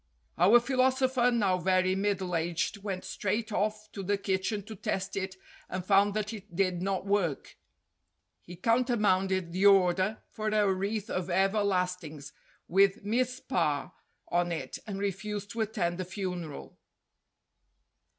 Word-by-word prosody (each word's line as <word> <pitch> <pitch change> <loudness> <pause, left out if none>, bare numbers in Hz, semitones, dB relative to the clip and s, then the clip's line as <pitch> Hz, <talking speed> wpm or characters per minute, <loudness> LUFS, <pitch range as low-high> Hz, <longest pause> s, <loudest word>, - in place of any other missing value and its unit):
Our 200 +8 +7
philosopher, 260 0 +2
now 200 -7 +2
very 185 +1 +2
middle 195 -2 -1
aged, 170 +4 -1
went 195 -2 -4
straight 215 +3 -2
off 215 +1 -2
to 200 - -6
the 200 +2 0
kitchen 195 +1 -1
to 220 +2 -9
test 190 0 -3
it 190 -1 -3 0.3
and 185 -1 -4
found 200 +1 +4
that 215 +1 -2
it 205 -4 -10
did 185 -2 +1
not 190 0 -1
work. 195 -8 -1 0.9
He 175 - -10
countermanded 195 -5 +1
the 190 +3 +3
order 190 +1 +3
for 215 0 -5
a 210 -2 +3
wreath 200 +3 -3
of 185 0 -2
everlast 190 -1 +1
ings 150 -2 -9 0.3
with 195 +2 +3
"Mizpah" 245 - 0 0.4
on 175 0 +1
it 165 - -4
and 200 -2 -4
refused 200 +1 -3
to 230 - -3
attend 195 -5 -1
the 185 - -2
funeral. 180 -4 -6
195 Hz, 140 wpm, -29 LUFS, 185-215 Hz, 0.9 s, Our